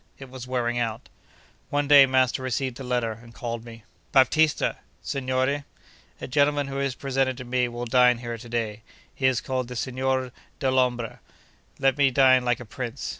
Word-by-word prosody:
It 135 Hz, -2 st, -11 dB
was 130 Hz, -1 st, -8 dB
wearing 120 Hz, -1 st, -1 dB
out. 115 Hz, 0 st, -3 dB, 0.6 s
One 145 Hz, 0 st, 0 dB
day 140 Hz, -1 st, +8 dB
master 130 Hz, -1 st, +2 dB
received 130 Hz, 0 st, -2 dB
a -, -, -6 dB
letter, 125 Hz, -2 st, -1 dB
and 115 Hz, -1 st, -16 dB
called 115 Hz, -1 st, -5 dB
me. 115 Hz, -2 st, -12 dB, 0.3 s
'Baptista!' 150 Hz, +3 st, +3 dB, 0.3 s
'Signore!' 130 Hz, +1 st, -1 dB, 0.6 s
'A -, -, -6 dB
gentleman 145 Hz, +2 st, +2 dB
who 135 Hz, 0 st, -4 dB
is 140 Hz, -2 st, -1 dB
presented 135 Hz, -1 st, -1 dB
to 130 Hz, -, -7 dB
me 125 Hz, 0 st, +1 dB
will 120 Hz, 0 st, -5 dB
dine 125 Hz, 0 st, +4 dB
here 120 Hz, -1 st, -6 dB
to 120 Hz, +1 st, -11 dB
day. 110 Hz, -2 st, -3 dB, 0.3 s
He 130 Hz, -, +1 dB
is 130 Hz, -3 st, +1 dB
called 130 Hz, -2 st, -2 dB
the 125 Hz, -, -8 dB
Signor 130 Hz, +1 st, -1 dB, 0.3 s
Dellombra. 125 Hz, -3 st, 0 dB, 0.6 s
Let 135 Hz, +1 st, +1 dB
me 140 Hz, -1 st, +5 dB
dine 130 Hz, -1 st, +5 dB
like 120 Hz, -1 st, 0 dB
a 120 Hz, -, -8 dB
prince. 120 Hz, +3 st, -5 dB
130 Hz, 175 wpm, -25 LUFS, 120-135 Hz, 0.6 s, day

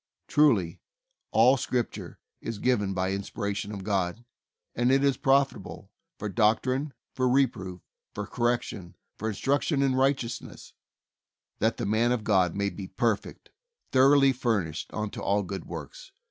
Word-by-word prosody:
Truly, 115 Hz, -, +3 dB, 0.5 s
"all 125 Hz, +5 st, +5 dB
Scripture 125 Hz, -2 st, -3 dB, 0.2 s
is 115 Hz, -2 st, -4 dB
given 105 Hz, -5 st, +1 dB
by 95 Hz, 0 st, 0 dB
inspiration 100 Hz, +1 st, -3 dB
of 100 Hz, -2 st, -6 dB
God, 100 Hz, +2 st, -1 dB, 0.5 s
and 120 Hz, +2 st, +2 dB
it 135 Hz, +1 st, +3 dB
is 140 Hz, -2 st, +3 dB
profitable 135 Hz, +2 st, 0 dB, 0.3 s
for 105 Hz, -, -4 dB
doctrine, 125 Hz, +6 st, +1 dB, 0.2 s
for 130 Hz, -1 st, +1 dB
reproof, 95 Hz, -9 st, 0 dB, 0.3 s
for -, -, -3 dB
correction, 120 Hz, -7 st, -2 dB, 0.2 s
for 110 Hz, -, -2 dB
instruction 140 Hz, -, 0 dB
in 135 Hz, -1 st, +2 dB
righteousness, 130 Hz, -2 st, -1 dB, 0.9 s
that 110 Hz, +1 st, +1 dB
the 120 Hz, -, -2 dB
man 110 Hz, +4 st, +2 dB
of 125 Hz, -3 st, 0 dB
God 95 Hz, -5 st, +2 dB
may 100 Hz, 0 st, 0 dB
be 95 Hz, -2 st, -7 dB
perfect, 105 Hz, +2 st, -2 dB, 0.4 s
thor 135 Hz, +2 st, +6 dB
oughly 135 Hz, -1 st, +5 dB
furnished 100 Hz, -11 st, -1 dB
unto 105 Hz, -1 st, -4 dB
all 100 Hz, +1 st, +1 dB
good 95 Hz, +1 st, -6 dB
works." -, -, -9 dB
115 Hz, 140 wpm, -27 LUFS, 100-130 Hz, 0.9 s, thor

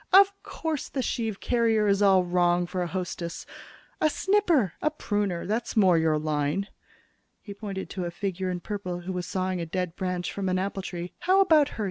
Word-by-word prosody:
Of 395 Hz, +1 st, +7 dB
course 320 Hz, -3 st, -4 dB
the 265 Hz, -, -2 dB
sheave 225 Hz, -5 st, -2 dB
carrier 225 Hz, -3 st, +2 dB
is 200 Hz, 0 st, +2 dB
wrong 180 Hz, -2 st, +3 dB
for 180 Hz, +1 st, -3 dB
a 175 Hz, -, -1 dB
hostess! 175 Hz, -1 st, -4 dB, 0.6 s
A 310 Hz, -, +4 dB
snipper, 340 Hz, -, +2 dB
a 305 Hz, -, +2 dB
pruner 205 Hz, -, -2 dB
that's 225 Hz, +3 st, -2 dB
more 190 Hz, -4 st, +6 dB
your 160 Hz, -1 st, +3 dB
line." 155 Hz, +5 st, -1 dB, 0.7 s
He 205 Hz, -, -9 dB
pointed 200 Hz, -2 st, -5 dB
to 185 Hz, -2 st, -3 dB
a -, -, -2 dB
figure 190 Hz, +1 st, -3 dB
in 180 Hz, -1 st, -3 dB
purple 185 Hz, -3 st, -4 dB
who 185 Hz, +2 st, -5 dB
was 180 Hz, -1 st, -3 dB
sawing 185 Hz, -1 st, -1 dB
a -, -, -2 dB
dead 180 Hz, 0 st, -3 dB
branch 180 Hz, -2 st, -2 dB
from 195 Hz, -2 st, -2 dB
an 185 Hz, -, +1 dB
apple 195 Hz, +1 st, -2 dB
tree. 175 Hz, -1 st, -6 dB
"How 375 Hz, +2 st, +3 dB
about 315 Hz, -7 st, +5 dB
her?" -, -, -11 dB
190 Hz, 190 wpm, -27 LUFS, 175-225 Hz, 0.7 s, Of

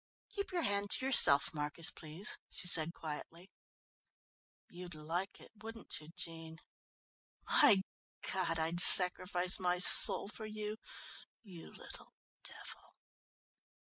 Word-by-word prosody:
"Keep 400 Hz, -2 st, -10 dB
your 350 Hz, -2 st, -6 dB
hand 200 Hz, 0 st, -6 dB
to 260 Hz, -, -5 dB
yourself, 145 Hz, -, +4 dB
Marcus, 150 Hz, +2 st, -4 dB
please," 160 Hz, +5 st, -8 dB
she -, -, -10 dB
said 165 Hz, -2 st, +2 dB
quietly. 165 Hz, +3 st, -14 dB, 1.2 s
"You'd 175 Hz, -1 st, -15 dB
like 165 Hz, +5 st, -9 dB
it, -, -, -20 dB
wouldn't 225 Hz, 0 st, -13 dB
you, 155 Hz, -, -19 dB
Jean? 165 Hz, -2 st, -14 dB, 0.9 s
My 195 Hz, -3 st, 0 dB, 0.5 s
God, 185 Hz, -3 st, -6 dB
I'd 165 Hz, +2 st, -5 dB
sacrifice 180 Hz, 0 st, +4 dB
my 180 Hz, -1 st, -5 dB
soul 185 Hz, -, +6 dB
for 215 Hz, +1 st, -14 dB
you, 215 Hz, 0 st, -10 dB, 0.7 s
you 180 Hz, -6 st, -17 dB
little -, -, -17 dB, 0.3 s
devil!" -, -, -14 dB
180 Hz, 115 wpm, -30 LUFS, 165-200 Hz, 1.2 s, soul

